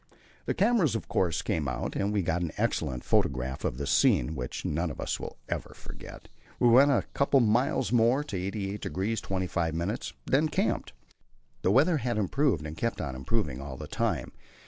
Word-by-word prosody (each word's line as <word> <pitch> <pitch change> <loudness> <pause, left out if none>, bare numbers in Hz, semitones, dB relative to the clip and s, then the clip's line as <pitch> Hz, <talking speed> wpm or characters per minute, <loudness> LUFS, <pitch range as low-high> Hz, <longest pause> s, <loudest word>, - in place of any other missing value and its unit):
The - - 0
cameras 195 - +3
of 115 - -4
course 85 -3 +1
had - - -19
to - - 0
come 75 - -2
out, 60 - -3
and 100 +1 0
we 105 -2 +1
got 85 +1 0
an 85 -3 -2
excellent 65 -2 -1
photograph 65 0 0
of 60 - -1
the 70 - -3
scene 70 0 +3
which 65 -4 -5
none 80 +3 0
of 70 - -8
us - - -2
will - - -7
ever - - -4
forget. - - -11 0.3
We 120 - +5
went 135 +5 +7
on 140 - +4
a - - +2
couple 140 0 +1
of 120 - +4
miles 120 +5 +1
more, 120 +4 +4
to 150 - -6
88° 100 +2 -2
25', 85 -4 -1
and 100 +8 -2 0.2
then 150 +4 +2
camped. - - -1 0.7
The - - +2
weather 150 - +4
had 120 -4 -1
improved, 105 - +1
and 75 +1 -6
kept 115 +6 -2
on 70 -6 -3
improving 70 - -2
all 70 -1 -7
the - - -7
time. - - -1
95 Hz, 200 wpm, -29 LUFS, 75-120 Hz, 0.7 s, went